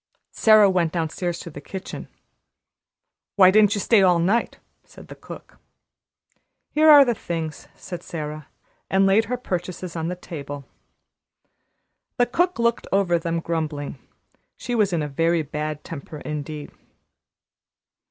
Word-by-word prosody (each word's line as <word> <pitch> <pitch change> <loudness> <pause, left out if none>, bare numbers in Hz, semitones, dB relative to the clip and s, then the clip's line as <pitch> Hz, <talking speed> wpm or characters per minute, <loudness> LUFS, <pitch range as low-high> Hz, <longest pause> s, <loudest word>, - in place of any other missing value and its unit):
Sara 215 -2 +6
went 175 -4 +1
downstairs 170 +1 -2
to 170 - -9
the - - -9
kitchen. 190 -1 -8 1.3
"Why 185 -2 +7
didn't 210 0 +4
you - - -2
stay 220 0 +4
all 180 -2 +5
night?" 195 +8 0 0.3
said - - -16
the - - -9
cook. - - -12 1.1
"Here 310 +1 +4
are 290 -2 +9
the 240 - +1
things," 165 -7 -5
said 175 -2 -8
Sara, 155 -3 -6 0.4
and 195 0 +3
laid 200 +3 +4
her 250 +3 -2
purchases 180 -5 -5
on 165 -1 -2
the 180 - -3
table. 145 -5 -8 1.5
The 245 - +4
cook 350 +9 0
looked 235 0 0
over 185 -3 +2
them, 165 0 -2
grumbling. 155 -4 -4 0.6
She 245 - -5
was 210 -4 +2
in 165 -3 0
a - - -3
very 165 +3 +1
bad 150 0 -5
temper 155 -2 -8
indeed. 150 0 -6
175 Hz, 140 wpm, -23 LUFS, 155-205 Hz, 1.5 s, are